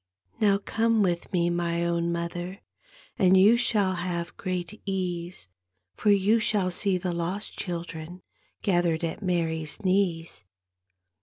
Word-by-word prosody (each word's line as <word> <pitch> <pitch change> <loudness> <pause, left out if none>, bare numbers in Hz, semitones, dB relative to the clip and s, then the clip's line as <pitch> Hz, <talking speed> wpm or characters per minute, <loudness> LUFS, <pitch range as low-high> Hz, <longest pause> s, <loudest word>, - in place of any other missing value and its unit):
" 90 +1 -30
Now 200 -2 +5
come 225 +2 +1
with 175 -2 -1
me, 175 -2 +1
my 170 0 0
own 170 0 0
mother, 175 +3 -4 0.6
And 190 0 +5
you 205 +5 +7
shall 215 -6 +2
have 175 -1 -3
great 185 +1 -4
ease. 180 - -3 0.5
For 210 - 0
you 205 +3 +4
shall 205 -4 +1
see 190 +1 0
the 180 -1 -2
lost 175 +5 -3
children 170 -1 -6 0.4
Gathered 175 -4 +1
at 165 +5 -3
Mary's 165 -2 -1
knees." 180 - 0
180 Hz, 135 wpm, -27 LUFS, 170-195 Hz, 0.6 s, you